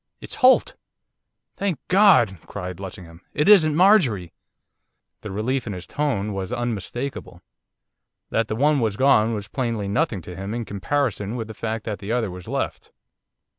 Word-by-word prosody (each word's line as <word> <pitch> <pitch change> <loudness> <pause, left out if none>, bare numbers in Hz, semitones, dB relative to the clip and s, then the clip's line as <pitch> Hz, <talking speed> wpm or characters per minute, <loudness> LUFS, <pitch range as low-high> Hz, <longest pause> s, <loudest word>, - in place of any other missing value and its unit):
'It's - - -7
Holt!' 260 - +4 0.8
'Thank 195 -6 -1
God!' 180 - +5
cried 90 -2 -6
Lessingham. 90 -3 -9
'It 150 - +1
isn't 160 -8 +6
Marjorie!' 155 - +4 0.9
The - - -7
relief 120 +6 -2
in 105 - -3
his 90 -1 -7
tone 115 -9 -2
was 95 +1 -4
unmistakable. 120 +2 -4 0.9
That 115 -1 +1
the 110 - -3
one 145 +4 +3
was 110 -4 -1
gone 115 -5 +4
was 105 -1 -5
plainly 115 -3 -2
nothing 105 - -1
to 90 - -9
him 95 +4 -5
in 120 -1 -3
comparison 105 0 -2
with 115 -3 -4
the - - -6
fact 110 +1 -4
that 105 -3 -4
the 100 +2 -5
other 115 -5 0
was 90 0 -10
left. - - -4
115 Hz, 160 wpm, -23 LUFS, 100-140 Hz, 0.9 s, isn't